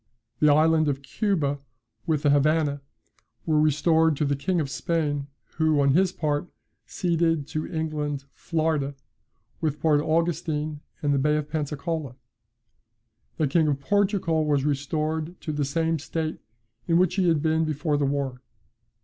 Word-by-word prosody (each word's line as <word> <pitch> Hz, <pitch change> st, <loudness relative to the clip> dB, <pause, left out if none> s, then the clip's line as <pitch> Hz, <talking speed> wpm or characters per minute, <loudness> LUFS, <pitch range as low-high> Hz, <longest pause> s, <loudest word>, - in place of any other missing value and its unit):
The 150 Hz, -1 st, +5 dB
island 155 Hz, +1 st, +4 dB
of 140 Hz, -1 st, -1 dB
Cuba, 145 Hz, -6 st, -1 dB, 0.5 s
with 155 Hz, -2 st, 0 dB
the 145 Hz, -, +4 dB
Havannah, 145 Hz, 0 st, +2 dB, 0.6 s
were 155 Hz, -2 st, +3 dB
restored 155 Hz, +1 st, +3 dB
to 150 Hz, -, +1 dB
the 140 Hz, 0 st, +1 dB
King 170 Hz, +6 st, -1 dB
of 150 Hz, -, -1 dB
Spain, 145 Hz, -1 st, -1 dB, 0.3 s
who, 160 Hz, -2 st, +3 dB
on 140 Hz, -1 st, +4 dB
his 185 Hz, +3 st, +3 dB
part, 150 Hz, -2 st, -1 dB, 0.4 s
ceded 165 Hz, -4 st, 0 dB
to 155 Hz, +1 st, -4 dB
England 150 Hz, -4 st, -3 dB
Florida, 155 Hz, -4 st, -1 dB, 0.7 s
with 150 Hz, -2 st, -1 dB
Port 150 Hz, -1 st, +3 dB
Augustine 155 Hz, -2 st, -1 dB, 0.2 s
and 145 Hz, -1 st, +2 dB
the 140 Hz, -, +2 dB
Bay 150 Hz, +2 st, +2 dB
of 150 Hz, -1 st, -4 dB
Pensacola. 150 Hz, -2 st, -3 dB, 1.2 s
The 155 Hz, -, +2 dB
King 155 Hz, +3 st, +2 dB
of 140 Hz, -2 st, 0 dB
Portugal 190 Hz, -1 st, +1 dB
was 145 Hz, -2 st, +1 dB
restored 155 Hz, +4 st, -2 dB
to 155 Hz, -, -4 dB
the 145 Hz, -1 st, 0 dB
same 160 Hz, +3 st, 0 dB
state 160 Hz, +2 st, -3 dB, 0.5 s
in 165 Hz, -1 st, +3 dB
which 180 Hz, -1 st, +3 dB
he 185 Hz, -2 st, +1 dB
had 160 Hz, -3 st, +2 dB
been 160 Hz, 0 st, +2 dB
before 155 Hz, 0 st, -1 dB
the 145 Hz, -1 st, +1 dB
war. 135 Hz, -3 st, -2 dB
155 Hz, 150 wpm, -25 LUFS, 145-160 Hz, 1.2 s, The